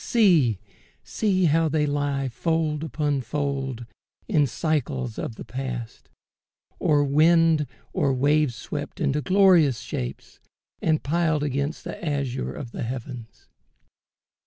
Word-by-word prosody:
see 170 - +4 0.9
how 160 +1 +3
they 150 0 +1
lie 145 -1 -1
Fold 155 +3 -1
upon 150 -3 -1
fold, 135 -2 -3 0.4
in 155 -9 +3
cycles 135 -4 -2
of 115 - -4
the - - -9
past, 125 -1 -6 0.7
Or 145 -1 +3
wind 155 +1 +4 0.3
or 140 - +1
wave 145 +2 +2
swept 145 - -6
into 150 -2 0
glorious 180 - +4
shapes, 65 - -6 0.4
And 155 -1 +1
piled 160 0 +1
against 140 +2 -2
the - - -7
azure 140 -5 -2
of 120 -4 -7
the - - -6
heavens. 120 -1 -7
145 Hz, 115 wpm, -25 LUFS, 130-155 Hz, 0.9 s, see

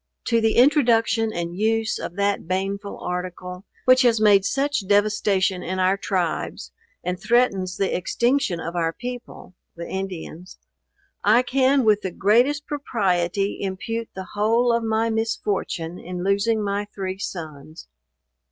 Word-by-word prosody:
To 230 -1 +3
the 225 0 +2
introduction 235 -4 +3
and 170 -2 -4
use 220 +2 0
or - - -4
that 200 0 -1
baneful 195 +2 -3
article, 180 +1 -5 0.2
which 255 0 +6
has 235 -3 +4
made 205 -2 +5
such 275 -3 0
devastation 205 -2 +2
in 185 +2 -4
our 185 +1 +3
tribes, 185 -4 -3 0.3
and 180 +1 -3
threatens 195 -7 +1
the 195 - 0
extinction 235 +1 0
of 165 +1 -5
our 165 -1 0
people, 245 -5 -8 0.2
(the 170 0 -7
Indians,) 185 -2 -6 0.7
I 225 +4 +5
can 265 0 +2
with 210 -1 +4
the 190 - -3
greatest 245 - +2
propriety 195 - -1
impute 220 +4 -4
the 190 -1 -7
whole 230 +3 +2
of 235 - 0
my 225 +1 0
misfortune 200 -6 -2
in 180 0 -6
losing 205 +3 +1
my 200 0 -1
three 190 -2 -5
sons. 155 -4 -7
200 Hz, 140 wpm, -23 LUFS, 185-230 Hz, 0.7 s, which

